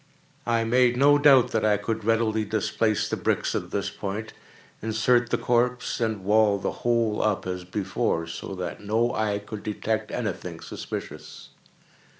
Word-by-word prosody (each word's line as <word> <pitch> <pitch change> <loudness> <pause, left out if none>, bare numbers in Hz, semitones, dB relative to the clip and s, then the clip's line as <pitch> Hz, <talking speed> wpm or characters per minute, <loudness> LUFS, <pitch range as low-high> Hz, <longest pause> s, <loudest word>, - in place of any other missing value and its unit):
I 115 -1 +2
made 120 +1 +3
no 145 +2 +5
doubt 140 -4 +6
that 110 - 0
I 105 -1 +3
could 110 +2 -3
readily 110 0 +1
displace 110 0 0
the - - -1
bricks - - 0
at - - -3
this - - -2
point, 105 +3 -5 0.5
insert 115 +2 +2
the - - +1
corpse, 125 +1 0
and 110 -4 -1
wall 105 0 +4
the 95 - -2
whole 115 -3 +1
up 105 -2 0
as 90 -1 -4
before, 95 -2 -1
so 85 +3 -7
that 90 +2 -5
no 115 +4 +1
eye 105 -1 0
could 105 0 -8
detect 110 +1 -2
any - - -2
thing - - -9
suspicious. - - -8
110 Hz, 160 wpm, -25 LUFS, 105-120 Hz, 0.5 s, doubt